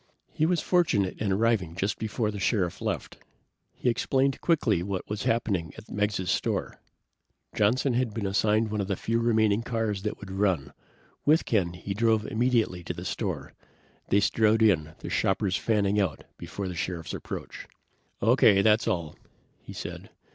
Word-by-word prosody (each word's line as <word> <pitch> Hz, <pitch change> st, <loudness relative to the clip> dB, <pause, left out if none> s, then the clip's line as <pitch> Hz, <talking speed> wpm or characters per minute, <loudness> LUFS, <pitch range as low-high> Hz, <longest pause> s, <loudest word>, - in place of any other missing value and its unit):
He 155 Hz, -, +1 dB
was 175 Hz, -1 st, +1 dB
fortunate 115 Hz, -, +1 dB
in 105 Hz, -2 st, 0 dB
arriving 100 Hz, -5 st, +1 dB
just 100 Hz, +3 st, -2 dB
before 110 Hz, 0 st, -1 dB
the 100 Hz, -, -6 dB
Sheriff 95 Hz, -4 st, 0 dB
left. -, -, -3 dB, 0.6 s
He -, -, -4 dB
explained 130 Hz, +3 st, +1 dB
quickly 120 Hz, -, +2 dB
what 95 Hz, 0 st, -4 dB
was 105 Hz, 0 st, -4 dB
happening 100 Hz, -8 st, 0 dB
at 110 Hz, -, -12 dB
Meggs' 105 Hz, -3 st, 0 dB
store. -, -, -2 dB, 0.7 s
Johnson 120 Hz, +5 st, +2 dB
had 120 Hz, -1 st, 0 dB
been 105 Hz, -1 st, -4 dB
assigned 105 Hz, +2 st, +2 dB
one 105 Hz, -1 st, -1 dB
of 95 Hz, -, -3 dB
the 100 Hz, -, 0 dB
few 115 Hz, +5 st, -1 dB
remaining 110 Hz, -2 st, +2 dB
cars 115 Hz, -4 st, -2 dB
that 105 Hz, +1 st, -3 dB
would 100 Hz, -2 st, -9 dB
run. 95 Hz, -8 st, 0 dB, 0.5 s
With 155 Hz, +3 st, +4 dB
Ken, 90 Hz, -6 st, +1 dB
he 95 Hz, +3 st, -5 dB
drove 110 Hz, 0 st, +2 dB
immediately 115 Hz, -7 st, 0 dB
to -, -, -4 dB
the -, -, -7 dB
store. -, -, -3 dB, 0.6 s
They 100 Hz, -, +4 dB
strode 110 Hz, +2 st, +3 dB
in, 80 Hz, -7 st, +2 dB
the -, -, -7 dB
shoppers 95 Hz, -1 st, +1 dB
fanning 105 Hz, -2 st, +1 dB
out 85 Hz, -7 st, -2 dB
before 100 Hz, -1 st, -6 dB
the 90 Hz, -, -4 dB
Sheriff's 85 Hz, -1 st, -4 dB
approach. -, -, -7 dB, 0.6 s
"Okay, 100 Hz, 0 st, +5 dB
that's 110 Hz, +2 st, +3 dB
all," 85 Hz, -8 st, -2 dB, 0.4 s
he -, -, -12 dB
said. -, -, -7 dB
105 Hz, 165 wpm, -27 LUFS, 95-115 Hz, 0.7 s, Okay